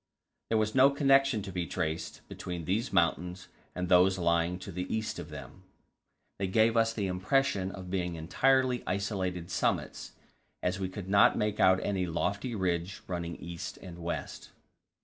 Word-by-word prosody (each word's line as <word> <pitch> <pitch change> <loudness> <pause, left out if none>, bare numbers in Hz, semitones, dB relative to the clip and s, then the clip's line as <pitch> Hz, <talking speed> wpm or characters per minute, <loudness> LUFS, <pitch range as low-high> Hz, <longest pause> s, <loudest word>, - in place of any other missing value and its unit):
There 115 - +2
was 110 0 +1
no 135 +1 +7
connection 135 -5 +3
to 95 - -6
be 90 -2 -3
traced 80 -2 -4
between 90 -3 -6
these 110 +9 -1
mountains 90 +1 0 0.3
and 90 0 -2
those 90 +1 +5
lying 85 0 +1
to 90 - -8
the 90 +2 -4
east 110 0 -2
of - - -7
them; 95 - -10 0.8
they 95 - 0
gave 110 +4 +3
us 115 0 +3
the 105 -3 -2
impression 95 +2 +1
of 95 -2 -8
being 90 -2 -1
entirely 130 +10 +2
isolated 95 -3 -2
summits, - - -1 0.5
as 90 +2 0
we 95 -1 -2
could 95 0 -7
not 100 +1 +5
make 105 0 -1
out 95 0 +5
any 95 -3 -1
lofty 100 +8 -2
ridge 90 -1 -2
running 85 -2 -4
east 85 -1 -7
and 85 -2 -10
west. 85 0 -5
95 Hz, 165 wpm, -30 LUFS, 90-110 Hz, 0.8 s, no